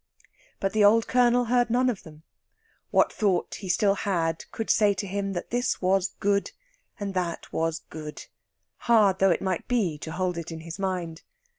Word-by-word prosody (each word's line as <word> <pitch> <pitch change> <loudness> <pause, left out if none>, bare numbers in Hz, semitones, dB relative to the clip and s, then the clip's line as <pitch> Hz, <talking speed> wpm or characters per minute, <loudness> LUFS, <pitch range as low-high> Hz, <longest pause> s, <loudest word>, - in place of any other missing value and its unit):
But 195 0 -1
the 215 -1 +3
old 220 +2 +5
Colonel 245 -1 +3
heard 245 +1 +2
none 250 +2 +2
of 235 -6 -1
them. 155 -1 -14 0.7
What - - +3
thought 195 -5 0
he 190 - -7
still 200 +2 +3
had 170 -5 -1
could 225 - -1
say 205 -2 +3
to 195 - -3
him 195 0 -3
that 175 - -5
this 245 +2 0
was 190 0 +1
good 200 0 0 0.5
and 200 -1 -4
that 180 -2 -3
was 165 0 -1
good, 155 -1 -8 0.6
hard 210 -5 +5
though 195 - +5
it 175 - +1
might 185 -3 -2
be 200 -12 0
to 160 - -6
hold 180 -1 -1
it 170 0 -7
in 165 0 -8
mind. 180 -4 -3
195 Hz, 180 wpm, -26 LUFS, 170-215 Hz, 0.7 s, old